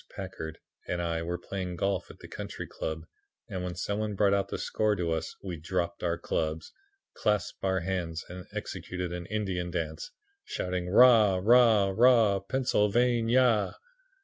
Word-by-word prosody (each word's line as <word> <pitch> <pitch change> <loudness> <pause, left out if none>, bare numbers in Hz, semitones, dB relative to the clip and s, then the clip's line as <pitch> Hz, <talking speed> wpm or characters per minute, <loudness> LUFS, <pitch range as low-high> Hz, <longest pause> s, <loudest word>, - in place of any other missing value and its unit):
Packard 80 -5 -7 0.3
and 90 - -2
I 85 -1 -1
were 85 +1 -3
playing 90 0 -5
golf 100 +3 -1
at - - -12
the - - -12
Country - - -6
Club 80 0 -5 0.4
and 90 -1 -4
when 90 -1 -4
some 100 +4 -2
one 105 -1 -2
brought 100 0 +3
out 100 0 +1
the - - -4
score 110 -1 0
to 85 -3 -1
us 80 0 -3
we 90 -3 -5
dropped 85 +1 -2
our 85 -1 0
clubs, 80 -2 -3 0.4
clasped 105 -2 -1
hands 90 -3 -1
and 90 0 -9
executed 90 -1 -5
an 90 0 -6
Indian 95 -4 -2
dance, 80 -2 -4 0.3
shouting 90 -1 -3
"Rah! 110 -2 +7
rah! 110 -2 +5
rah! 115 -4 +5
Pennsylvania!" 120 +1 +2
95 Hz, 150 wpm, -29 LUFS, 85-105 Hz, 0.4 s, Rah